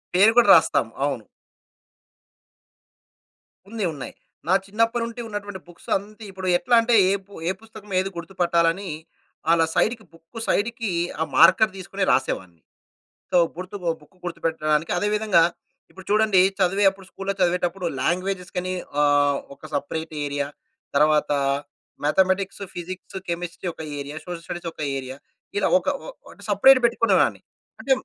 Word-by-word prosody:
పేరు 205 +4 +7
కూడా 240 - +6
రాస్తాం. - - +3 0.2
అవును. - - -2 2.4
ఉంది. 220 -1 -4
ఉన్నాయి. 140 - -8 0.3
నా 185 - +3
చిన్నప్పటినుంచి 230 +3 -1
ఉన్నటువంటి 205 -2 -6
బుక్స్ 175 - -15
అంత 210 +3 -12
ఇప్పుడు 190 0 -6
ఎట్లా 245 +6 +2
అంటే, 235 +1 +1 0.2
ఏ - - +3
పు 200 - -17 0.2
ఏ - - +2
పుస్తకం 215 -2 -13
ఏది 190 +1 -1
గుర్తుపట్టాలని, 170 +1 0 0.6
అలా 165 -1 +4
సైడ్‌కి, 225 0 +1
బుక్ 165 +7 -12
సైడ్‌కి 225 0 0 0.3
ఆ - - +4
మార్కర్ 185 +5 +6
తీసుకొని 195 +1 -4
రాసేవాడిని. 90 -10 -1 0.7
సో, 180 - +4 0.2
గుర్తు 185 +3 -7
బొ 170 - +1
బుక్ 150 +5 -22
గుర్తుపెట్టడానికి. 160 -2 -1
అదే 205 - 0
విధంగా 210 -6 +4 0.5
ఇప్పుడు 190 -1 -13
చూడండి, 215 -3 +4 0.2
చదివేప్పుడు 195 +1 +2
స్కూల్‌లో 195 0 -4
చదివేటప్పుడు 180 0 0
లాంగ్వేజస్‌కని 185 +2 -2 0.3
ఆహ్, 145 -1 +3 0.2
ఒక - - -35
సెపరేట్ 160 +3 -3
ఏరియా. 145 0 -2 0.5
తరువాత 150 0 +3 0.7
మ్యాథమేటిక్స్, 190 +5 +1
ఫిజిక్స్, 185 +2 -7
కెమిస్ట్రీ 175 +1 -4
ఒక - - -10 0.2
ఏరియా. 140 +2 -6
సోషల్ 175 -2 -6
స్టడీస్ 175 0 -5
ఒక - - -9 0.2
ఏరియా. 130 0 -7 0.4
ఇలా 205 - +2
ఒక 175 - -14 0.2
ఓ - - -9 0.2
అంటే - - -16
సెపరేట్ 270 -1 +6
పెట్టుకునేదాన్ని. 230 -1 +2 0.4
అంటే 275 - -3
185 Hz, 135 wpm, -23 LUFS, 165-205 Hz, 2.4 s, పేరు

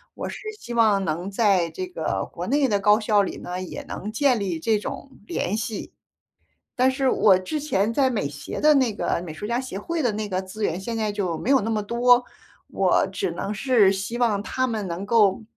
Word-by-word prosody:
我 - - -5
是 - - -6 0.2
希 240 - -7
望 215 -4 +3
能 175 +4 -3
在 195 -5 +2
这 370 -1 -5
个 360 - -3
国 - - -5
内 280 0 +2
的 205 -4 0
高 210 +1 +5
校 210 -2 +3
里 - - -4
呢， 180 +1 -5
也 185 - -7
能 210 - -6
建 255 +2 +2
立 190 -6 -2
这 220 +6 +2
种 265 +6 -7
联 200 -1 -2
系。 220 -1 -4 0.8
但 255 +1 +4
是 265 0 +1
我 195 -3 +5
之 185 +12 -3
前 230 -8 0
在 265 +2 +2
美 210 - -1
协 145 0 -7
的 305 0 +6
那 255 -6 +2
个 - - -1
美 155 - -7
术 155 - -8
家 235 +3 0
协 255 -7 -7
会 335 +11 -3
的 240 -4 +1
那 210 0 -3
个， 185 -1 -1
资 190 +3 -8
源 170 -1 0
现 230 +4 -4
在 215 -1 0
就 195 -5 -2
没 240 - -3
有 270 -2 +5
那 220 - -2
么 215 -2 0
多， 245 +3 +4 0.4
我 - - +2
只 395 - -2
能 200 - -4
是 220 -3 +4
希 200 +5 -4
望 225 -5 +2
他 255 +4 -1
们 220 -4 -3
能 175 +2 -4
够， 205 -2 +3
215 Hz, 240 characters per minute, -24 LUFS, 195-245 Hz, 0.8 s, 的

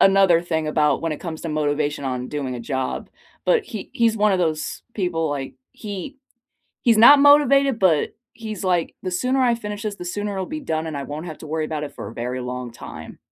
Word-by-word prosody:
another 195 -3 +6
thing 160 -3 -1
about 150 -2 +2
when 165 -1 -1
it - - -6
comes 160 -3 -6
to 165 - -5
motivation 150 -1 -1
on 125 -1 -3
doing 140 -4 -3
a 120 - -5
job, 130 +2 -3 0.4
but 465 -4 +3
he 220 - -7
he's 230 -4 +2
one 210 -1 +3
of 190 - +2
those 160 -3 -1
people 165 -6 -1
like, 135 -2 -4 0.2
he 210 +6 -7 0.7
he's 230 -4 +4
not 280 +5 +9
motivated, 280 -3 +5
but 170 -7 +2 0.2
he's 215 -4 -6
like, 175 -3 0
"The 185 - -1
sooner 255 +8 +1
I 245 -2 +4
finish 210 -2 -6
this, 210 -2 -3
the - - -7
sooner 205 +3 -3
it'll 190 -1 -3
be 310 - -5
done 160 - -2
and 155 -2 -4
I 140 - -4
won't 150 +4 -6
have 160 -3 -7
to 155 - -10
worry 155 +1 -1
about 150 -1 -3
it 145 - -9
for - - -7
a 110 - -11
very 125 +2 -3
long 125 -1 -5
time." - - -10
170 Hz, 225 wpm, -22 LUFS, 150-215 Hz, 0.7 s, not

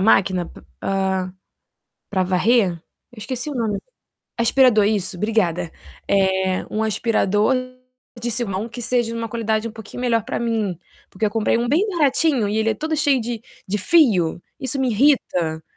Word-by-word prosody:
máquina 190 -3 +3
p - - -14 0.2
ah, 190 -1 -1 0.8
pra 190 -2 +1
varrer? 190 +2 +3 0.4
Eu 235 - -14
esqueci 255 +6 -4
o 290 - -5
nome. 220 -4 -1 0.6
Aspirador, 235 -2 +4
isso, 200 -3 0
obrigada. 180 -5 0 0.4
Eh, 190 -1 +1
um 215 +1 -1
aspirador 215 +1 +1 0.7
de 240 +1 -2
se 240 +1 -1
mão, 200 +3 -3
que 240 +1 -8
seja 240 -1 0
uma 230 -1 -3
qualidade 220 0 -1
um - - -10
pouquinho 220 +1 -9
melhor 230 -3 +1
pra 260 - -3
mim, 220 -6 -1 0.3
porque 195 +3 -3
eu - - -1
comprei 225 +1 +1
um 240 0 -1
bem 335 +10 +2
baratinho 295 - +2
e 210 - -1
ele 220 0 +2
é - - 0
todo 315 +6 -2
cheio 280 -3 +2
de 230 -1 -4 0.3
de 210 +2 -1
fio, 195 - +3 0.2
isso 265 +1 -2
me 260 - +1
irrita. 180 - +2
220 Hz, 170 wpm, -21 LUFS, 195-240 Hz, 0.8 s, Aspirador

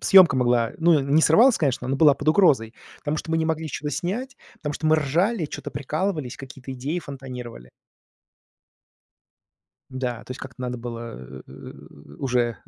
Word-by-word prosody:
съёмка 185 -9 +7
могла 120 -2 +2
ну, 165 -2 +5
не 140 +4 +2
срывалась, 225 +12 +6
конечно, 135 -5 -1
но 135 - 0
была 150 -1 +6
под 155 - -3
угрозой, 145 - +4 0.2
потому 150 0 -2
что 160 - -5
мы 165 - +2
не 160 - 0
могли 160 0 -1
ничего 150 -1 -4
снять, 240 - -3 0.2
потому 150 -2 -4
что 155 - -3
мы 155 0 +5
ржали, 165 - +1
чё-то - - -7
прикалывались, 150 -1 -3
какие-то 135 -1 -9
идеи 135 +7 -3
фонтанировали. 125 - -8 2.2
Да, 125 -3 -4
то - - -6
есть 130 - -10
как-то 130 -1 -10
надо 125 0 -3
было, 115 - -8
э, - - -11 0.5
уже, 125 -2 +1
э, 120 -1 -1
140 Hz, 165 wpm, -24 LUFS, 125-160 Hz, 2.2 s, съёмка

